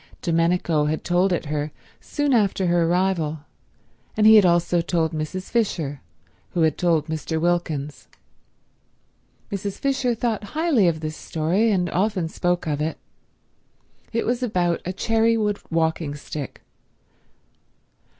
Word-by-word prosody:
Domenico 165 -2 +1
had 155 +1 -1
told 180 +2 +2
it 175 - -1
her 150 0 -2 0.3
soon 290 -2 -1
after 200 -4 +2
her 170 -1 +2
arrival, 170 -4 0 0.8
and 215 - +3
he 220 0 +9
had 205 -4 +7
also 175 0 +2
told 165 -2 0
Mrs. 160 +4 -5
Fisher, 160 - -1 0.5
who 170 - +3
had 155 -2 +2
told 165 -4 +1
Mr. 160 0 -3
Wilkins. 160 -4 -1 1.4
Mrs. 200 0 -4
Fisher 265 -3 0
thought 225 -2 -1
highly 310 - +3
of 160 -2 0
this 155 0 -4
story, 170 +11 0
and 185 -4 +1
often 190 -2 0
spoke 175 +2 -1
of 150 -2 -1
it. 160 +1 -2 1.1
It 230 - -1
was 240 +1 0
about 180 -8 0
a 180 - -2
cherrywood 220 0 +1
walking 160 -2 0
stick. 145 -1 -7
175 Hz, 130 wpm, -23 LUFS, 160-205 Hz, 1.4 s, he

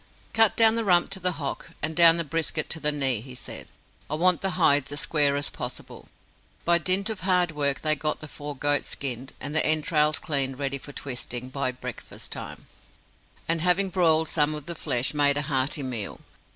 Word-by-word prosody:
"Cut 225 -3 +5
down 225 -1 +7
the 230 0 -1
rump 180 -4 +3
to 190 - -3
the 180 0 +1
hock, 140 -4 -5
and 155 +1 -3
down 170 -1 +7
the 170 - -1
brisket 160 0 -2
to 160 - -3
the 150 -1 +2
knee," 135 -6 +1
he 125 +1 -10
said. 125 - -6 0.4
"I 150 - -1
want 180 +2 +2
the 195 - 0
hides 145 -5 +3
as 145 - -5
square 145 -3 +2
as 145 0 -3
possible." - - -8 0.6
By 170 0 +4
dint 190 +5 +1
of 215 - -6
hard 180 -2 +1
work 140 -3 -1
they 155 -1 +2
got 150 +1 -2
the 155 - -9
four 145 0 -8
goats 145 +1 0
skinned, 130 -1 -5
and 145 +2 -6
the 160 - +5
entrails 155 0 +3
cleaned 135 -4 -2
ready 140 -1 -2
for 145 - -10
twisting, 125 -2 -6
by 130 -1 -2
breakfast 125 -1 -9
time; - - -7 0.8
and 165 0 0
having 180 +2 +2
broiled 160 -3 +3
some 155 -1 +1
of 150 -2 -7
the 170 - -5
flesh, 135 -5 -1
made 145 -1 +3
a 145 - -1
hearty 140 0 -1
meal. 120 -6 -4
150 Hz, 205 wpm, -25 LUFS, 140-170 Hz, 0.8 s, down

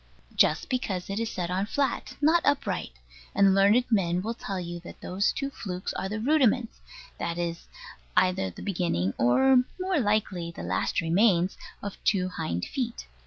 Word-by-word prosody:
Just - - +3
because 195 -8 -2
it 200 - -2
is 230 -1 -1
set 180 -4 -3
on 190 +3 0
flat, 280 +3 -1
not 320 +3 +4
upright: 285 -1 0 0.4
and 195 -1 +5
learned 200 +5 +5
men 180 -4 +2
will 225 +2 -2
tell 195 -4 -5
you 175 -1 -5
that 170 - -12
those 190 +3 0
two 275 0 -3
flukes 185 -7 -5
are 190 - -3
the 215 +2 -3
"rudiments" 250 -3 +2 0.4
that 170 0 -2
is, 170 -1 -3 0.5
either 180 - +3
the 90 - -10
beginning, 170 - 0
or 250 - +5 0.2
more 370 -3 +1
likely 205 -6 0
the 170 - -8
last - - 0
remains 180 +1 +3 0.3
of 205 -1 -7
two 185 -3 +2
hind 155 - -3
feet. 240 -3 -4
195 Hz, 165 wpm, -27 LUFS, 175-235 Hz, 0.5 s, and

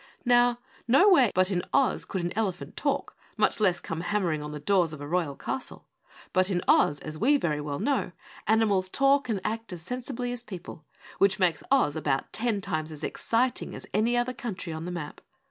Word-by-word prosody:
Now 245 0 +4 0.3
nowhere 275 - +6
but 185 +1 +3
in 180 -2 +1
Oz 275 -2 +2
could 190 - -3
an 175 +1 -3
elephant 195 -5 -2
talk, 280 -1 -1 0.2
much - - +2
less 185 -5 +3
come 165 0 -5
hammering 175 -5 0
on 150 0 -6
the 150 - -6
doors 180 -2 +2
of 155 - -8
a 145 - -6
royal 165 -3 -1
castle, 265 - -5 0.5
but 185 +1 +3
in 180 -3 +1
Oz, 145 -1 +4
as 155 0 -7
we 285 +6 +4
very 150 - -1
well 145 -1 -3
know, 275 - 0 0.4
animals 205 -4 +3
talk 275 +2 +3
and 210 -3 0
act 225 0 -3
as 175 -2 -6
sensibly 250 +3 -4
as 245 -1 -4
people, 180 -7 -9 0.3
which 195 -1 +4
makes 175 -6 +1
Oz 265 - +3
about 140 -4 -1
ten 220 -3 -1
times 155 -5 -3
as 155 0 -9
exciting 245 +2 -1
as - - -8
any 225 +4 +2
other 245 +1 0
country 220 -10 -5
on 160 +1 -5
the 180 - -4
map. 165 -4 -6
195 Hz, 195 wpm, -27 LUFS, 165-245 Hz, 0.5 s, nowhere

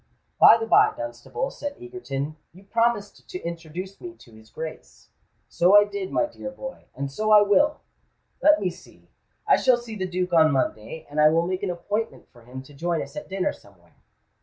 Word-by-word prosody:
"By - - +9
the 225 - -3
by, 225 - +4
Dunstable," 120 - -5
said 285 -1 -6
Egerton, 360 - -5 0.2
"you 185 +3 -16
promised 230 -1 -1
to 180 - -5
introduce 170 +3 -7
me 350 -1 -8
to 120 - -19
his 110 0 -17
Grace." 155 - -9 0.4
"So 180 +5 +5
I - - +5
did, 200 -2 -5
my - - +2
dear 295 -2 -8
boy—and 265 - -8
so 215 +9 -2
I 210 -1 +8
will. 245 +9 +2 0.6
Let 305 0 +5
me 185 -2 -1
see—I 175 - -4
shall 255 -2 +4
see 240 -2 -8
the 190 -2 -3
Duke 180 0 -3
on 160 -2 +5
Monday, 130 +2 -2
and 150 +1 -1
I 150 - +7
will 165 +2 +2
make 185 +1 -3
an 200 - -2
appointment 205 +6 -4
for 120 - -18
him 125 +3 -10
to 145 - -16
join 165 +3 -2
us - - -12
at 300 - -7
dinner 190 -1 -1
somewhere." 90 -4 -21
185 Hz, 190 wpm, -24 LUFS, 150-225 Hz, 0.6 s, By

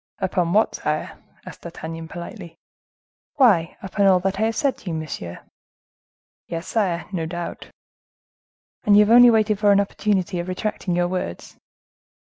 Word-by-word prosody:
"Upon 180 -2 -1
what, 215 +4 +3
sire?" 150 0 -3 0.3
asked - - -11
D'Artagnan, 165 -1 -7
politely. 170 0 -9 0.8
"Why, 200 - +3
upon 200 +1 +1
all 185 -1 +5
that 195 +1 -2
I 220 - +2
have 225 - -3
said 275 +1 0
to 185 - -7
you, 165 - -3
monsieur." 140 - -6 1.1
"Yes, 165 0 -5
sire, 185 -6 0
no 165 -4 -3
doubt—" 175 +1 -6 1.2
"And 205 -1 +5
you 210 - +7
have 220 - +3
only 245 0 +9
waited 215 -2 +2
for 205 -1 +4
an 200 - +5
opportunity 195 -3 -1
of 175 - -4
retracting 185 -1 -3
your 175 0 +1
words?" 180 - -5
185 Hz, 155 wpm, -22 LUFS, 170-210 Hz, 1.2 s, only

